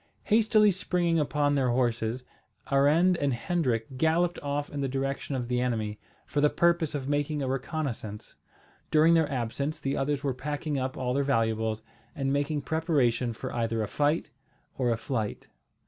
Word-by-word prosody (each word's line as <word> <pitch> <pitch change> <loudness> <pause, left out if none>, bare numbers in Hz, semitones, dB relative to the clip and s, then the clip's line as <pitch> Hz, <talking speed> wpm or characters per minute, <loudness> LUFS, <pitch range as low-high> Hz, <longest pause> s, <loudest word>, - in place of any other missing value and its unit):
Hastily 215 -1 +4
springing 175 -2 +1
upon 145 -1 +1
their 135 -3 +2
horses, 120 0 0 0.5
Arend 155 +7 +4
and 140 -4 0
Hendrik 130 -5 -1
galloped 170 +2 +2
off 145 0 -2
in 145 - -3
the 135 - 0
direction 135 +1 -2
of 125 -2 -3
the 125 0 0
enemy, 110 -4 -2 0.3
for 145 - -1
the 150 - +5
purpose 170 -2 +2
of 135 -2 -3
making 145 0 0
a - - -1
reconnaissance. 130 -6 -4 0.5
During 160 +2 +5
their 160 -3 +3
absence 140 +5 -2
the 140 -1 -2
others 140 0 -1
were 140 -2 0
packing 145 +2 -3
up 130 0 -3
all 125 -1 -1
their 140 +1 +1
valuables, 110 -4 0 0.3
and 135 -3 -1
making 145 +1 0
preparation 135 -6 +1
for 110 - -6
either 115 -1 0
a - - -3
fight 150 +8 0 0.4
or 125 -2 0
a 115 - +1
flight. 110 -3 -3
140 Hz, 165 wpm, -28 LUFS, 125-155 Hz, 0.5 s, the